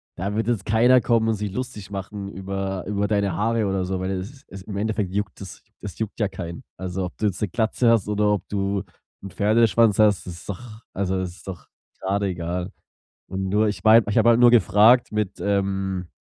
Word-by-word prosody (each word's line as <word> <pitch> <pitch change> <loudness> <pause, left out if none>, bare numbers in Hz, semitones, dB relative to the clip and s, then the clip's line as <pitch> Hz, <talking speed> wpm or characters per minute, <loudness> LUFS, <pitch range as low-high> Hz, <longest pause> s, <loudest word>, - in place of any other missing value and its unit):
da 100 +3 -3
wird 110 +1 -1
jetzt 115 -5 -1
keiner 120 +4 +5
kommen 115 -2 +2
und 115 - +1
sich 105 -1 -4
lustig 105 -3 -6
machen 100 0 -6
über 95 -1 -4
über 105 0 0
deine 100 -3 0
Haare 115 +2 0
oder 95 -1 -1
so, 95 0 -2
weil 95 +1 -3
es 100 +9 -6
es 95 -1 -10
im 100 -1 -6
Endeffekt 105 -2 -1
juckt 100 0 -3
es 95 - -9 0.2
es 100 +1 -8
juckt 110 +1 -4
ja 105 - +2
keinen. 85 -3 -7
Also, 95 0 -4
ob 90 - -8
du 105 - +1
jetzt 95 -2 -3
'ne 105 - 0
Glatze 115 +3 +1
hast 110 -4 +2
oder 105 0 +1
ob 105 - -2
du 100 -1 -1 0.4
'n 100 - -6
Pferdeschwanz 110 +2 +3
hast, 105 -3 +4
das 90 - -6
ist 85 - -13
doch 110 +3 -8
also, 95 -1 -1
ist 90 +1 -7
doch 90 -3 -8 0.3
grade 100 +2 -1
egal. 90 +1 -3 0.6
Und 95 0 -3
nur 105 +2 +2
ich 105 - -5
meine 110 +1 +7
ich 105 - -1
habe 115 +1 +5
halt 115 0 +4
nur 120 -1 +8
gefragt 115 +1 +5
mit, 105 -2 -2
ähm 95 -2 -1
100 Hz, 215 wpm, -23 LUFS, 95-110 Hz, 0.6 s, nur